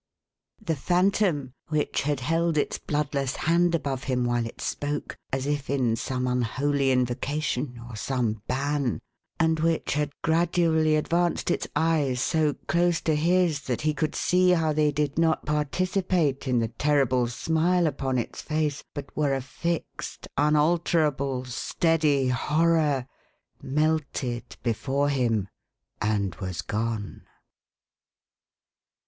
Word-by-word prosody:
" - - -49
The 160 - +3
Phantom, 175 - +1
which 155 -1 0
had 145 -2 -1
held 165 +4 +1
its 145 - 0
bloodless 140 -3 -1
hand 170 +1 +2
above 140 -4 -3
him 125 -2 0
while 120 -1 0
it - - -11
spoke, 145 0 -3 0.2
as 135 0 -1
if 145 -1 -2
in 130 -5 +1
some 125 +2 -2
unholy 135 +3 +1
invocation, 125 +1 -1
or 120 - -8
some 110 -2 -1
ban; 140 -2 0 0.4
and 160 -1 +2
which 165 0 +1
had 150 0 0
gradually 160 -1 +3
advanced 170 +3 +1
its - - -1
eyes 150 -6 +1
so 155 +2 +1
close 175 +1 +2
to 160 - +1
his, 170 -1 +2
that 125 -3 -1
he 155 0 +1
could 150 +1 -2
see 180 0 +3
how 165 -3 +3
they 150 0 +2
did 145 +1 -1
not 160 -1 +2
participate 155 0 0
in 125 -1 +2
the 115 -1 +1
terrible 130 -1 +2
smile 165 +8 +1
upon 135 -3 -1
its 120 - -3
face, 155 -2 -1
but 145 -2 -7
were 145 -3 +1
a - - -1
fixed, 165 +6 -4
unalterable, 150 -3 +2
steady 145 +1 +1
horror; 150 0 +2 0.6
melted 140 -5 -1
before 135 +5 0
him 115 -8 +1 0.5
and 100 -3 0
was 90 -2 -4
gone. 110 -1 -3
145 Hz, 130 wpm, -26 LUFS, 130-160 Hz, 0.6 s, The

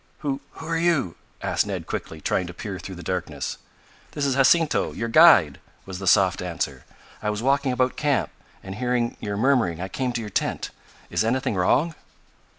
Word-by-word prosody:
"Who 140 -2 -2
who 160 - -10
are 165 0 -1
you?" 165 - +1 0.3
asked - - +1
Ned - - -4
quickly, 80 - -5
trying 90 +3 0
to 90 - -9
peer 95 0 -6
through 95 - -8
the 90 - -9
darkness. 90 +1 -4 0.5
"This 145 - -1
is 135 - +2
Jacinto 150 +4 +3
your 115 - -3
guide," 115 - +6 0.3
was 95 -1 -7
the 95 - -5
soft 95 -1 +4
answer. 85 -7 -4 0.4
"I 105 - -1
was 105 +2 -3
walking 140 0 +2
about 125 0 0
camp 145 -3 0 0.3
and, 95 - -7
hearing 120 +1 -1
you 105 -1 -4
murmuring, 115 -9 +2
I 95 +2 -4
came 130 +5 -2
to 120 - -2
your 105 -2 -7
tent. - - -2 0.4
Is - - +1
anything 120 +1 0
wrong?" 135 - +2
115 Hz, 185 wpm, -24 LUFS, 95-135 Hz, 0.5 s, guide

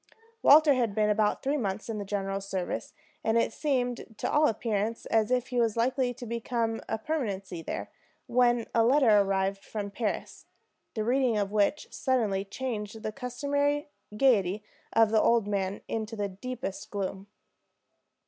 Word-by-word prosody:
Walter 300 0 +7
had 235 -6 0
been 210 -1 +3
about 210 0 +1
three 280 +2 +1
months 205 -4 -3
in 225 -2 -3
the - - -3
general's 195 0 -3
service, 185 -2 -3 0.3
and 225 +1 +2
it 230 - +1
seemed 245 -5 -2
to - - -2
all 300 +1 +4
appearance 220 0 -1
as 220 -1 +2
if 250 -1 0
he 250 -1 0
was 230 -1 +1
likely 250 +2 +1
to 245 0 -8
become 230 0 -2
a - - 0
permanency 200 - -3
there, - - -5 0.3
when 240 -1 +3
a 230 - +4
letter 240 -4 +5
arrived 195 0 0
from 205 -2 -5
Paris, 215 0 -4 0.5
the 215 - -1
reading 245 -1 +2
of 200 -1 -1
which 215 +8 0
suddenly 220 -8 0
changed 215 -1 -5
the 215 - -2
customary 285 +4 -1 0.3
gayety 210 -6 +3 0.3
of 225 -1 +4
the 220 -1 +4
old 230 -3 +3
man 200 -1 -2
into 225 0 -3
the 205 -2 -1
deepest 215 0 -6
gloom. 195 -1 -4
225 Hz, 160 wpm, -29 LUFS, 205-250 Hz, 0.5 s, Walter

